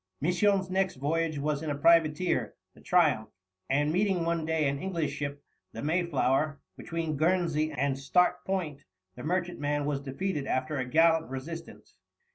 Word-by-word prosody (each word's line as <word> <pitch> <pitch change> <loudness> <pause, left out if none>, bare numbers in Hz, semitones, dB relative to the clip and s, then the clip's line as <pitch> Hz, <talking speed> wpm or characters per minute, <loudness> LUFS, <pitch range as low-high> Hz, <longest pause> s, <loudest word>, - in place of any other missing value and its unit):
Misson's 185 +4 +2
next 190 0 +1
voyage 155 +3 -1
was 145 0 -1
in 160 - -3
a 145 - -1
privateer, 165 +2 +3 0.2
the - - -18
Triumph, 150 -11 +2 0.4
and, 145 +3 +2
meeting 190 -2 +1
one 170 -1 -1
day 160 -2 +1
an 140 0 -1
English 170 -5 -2
ship, 145 -1 -5 0.3
the - - -6
Mayflower, 155 -3 +1 0.2
between 165 -3 -3
Guernsey 160 -1 +1
and 140 -1 -1
Start 180 +6 +2
Point, 160 -7 -3 0.3
the - - -9
merchantman 155 -4 -1
was 145 -1 -1
defeated 145 +2 -3
after 130 +3 -1
a 130 - -1
gallant 160 +3 +3
resistance. 160 +6 -8
155 Hz, 150 wpm, -29 LUFS, 145-175 Hz, 0.4 s, privateer